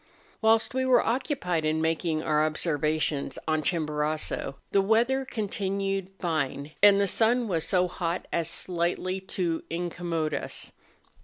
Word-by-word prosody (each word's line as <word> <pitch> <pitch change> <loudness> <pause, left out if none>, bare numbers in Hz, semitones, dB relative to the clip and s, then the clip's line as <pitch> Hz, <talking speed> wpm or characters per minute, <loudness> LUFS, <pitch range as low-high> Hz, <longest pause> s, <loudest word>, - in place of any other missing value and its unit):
Whilst 225 +1 +3
we 260 0 0
were 255 -2 +4
occupied 225 - -1
in 155 +1 +1
making 160 0 0
our 150 -1 +2
obser¬ 155 -1 -1
vations 155 -1 0
on 155 -1 +1
Chimborazo 150 -2 -1 0.2
the 195 - +4
weather 235 +6 +2
continued 195 -4 -2
fine, 155 -4 -2
and 200 -1 +7
the 200 - +3
sun 230 +4 +2
was 165 -5 -1
so 180 -1 +3
hot 175 0 -3
as 170 -1 +1
slightly 180 +2 -1
to 180 -3 -2
incommode 170 -2 -2
us. - - -3
175 Hz, 140 wpm, -27 LUFS, 155-200 Hz, 0.2 s, and